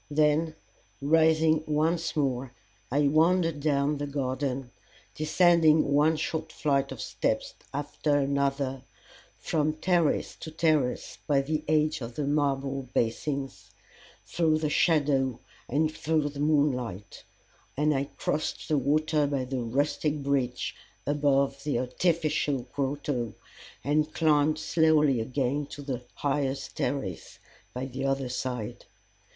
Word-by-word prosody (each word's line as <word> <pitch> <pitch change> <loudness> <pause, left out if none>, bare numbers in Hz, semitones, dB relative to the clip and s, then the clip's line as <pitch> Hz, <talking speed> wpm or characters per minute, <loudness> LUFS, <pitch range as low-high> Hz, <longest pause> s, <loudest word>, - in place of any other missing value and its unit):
Then 155 +2 +2 0.4
rising 160 +1 +3
once 160 +2 0
more, 130 -3 -1 0.3
I 140 +4 +2
wandered 165 +1 +3
down 145 0 +1
the 145 - -2
garden, 135 -2 -2 0.4
descending 160 -1 +4
one 150 +3 +4
short 155 +1 -3
flight 140 -3 0
of - - -7
steps - - -2 0.2
after 145 +1 -1
another 140 -1 0 0.6
from 155 -1 0
terrace 170 0 +1
to - - -7
terrace 155 -5 0
by 140 -3 +3
the 155 +2 -2
edge 155 -1 +2
of 115 0 -6
the 150 - -2
marble 135 -2 -1
basins, 135 +4 -2 0.6
through 160 -2 +1
the 155 -1 -1
shadow 140 -7 +2 0.3
and 155 +4 +1
through 155 -1 0
the 140 0 -9
moonlight; 125 - 0 0.5
and 150 +1 +3
I 135 0 0
crossed 150 +2 -3
the 150 -2 +3
water 150 +2 +2
by 140 -2 -1
the 130 0 -3
rustic 145 +4 -1
bridge 135 -3 -1 0.3
above 140 -1 +1
the 145 -4 0
artificial 150 +1 0
grotto, 135 -4 -2 0.5
and 150 +3 +1
climbed 155 -1 +3
slowly 155 -6 +3
up 110 - -4
again 140 +2 -1
to 145 0 -9
the 130 -3 -4
highest 135 -1 -2
terrace 125 -9 -3 0.3
by 125 +1 -4
the 135 +1 -4
other 135 -1 0
side. 125 -3 -4
145 Hz, 125 wpm, -28 LUFS, 135-155 Hz, 0.6 s, descending